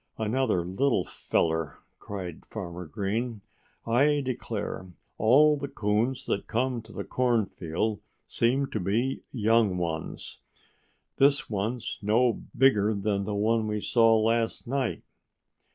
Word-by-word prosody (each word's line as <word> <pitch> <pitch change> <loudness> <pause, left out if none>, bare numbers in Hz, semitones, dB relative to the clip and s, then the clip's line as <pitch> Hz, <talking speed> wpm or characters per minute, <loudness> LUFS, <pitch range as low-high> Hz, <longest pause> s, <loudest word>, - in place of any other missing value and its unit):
"Another 110 -5 0
little 95 +3 +1
feller!" 80 -3 -1 0.2
cried 90 -5 -7
Farmer 90 -5 -6
Green. 110 +5 -3 0.4
"I 145 +5 +3
declare, 115 -6 -4 0.3
all 145 +7 +5
the 140 0 -4
coons 120 +4 -1
that 100 - -2
come 125 +1 0
to 110 0 -15
the 100 -1 -5
cornfield 110 -4 -1 0.2
seem 130 +4 +1
to 110 - -2
be 115 +8 0
young 110 -4 +2
ones. 80 -3 -4 0.8
This 140 -2 +3
one's 110 +4 -3
no 115 +4 +3 0.2
bigger 110 -5 +4
than 100 0 -1
the 105 0 -2
one 110 +2 +1
we 105 0 -1
saw 115 +1 +4
last 115 +1 0
night." 130 -1 -1
110 Hz, 120 wpm, -27 LUFS, 100-125 Hz, 0.8 s, all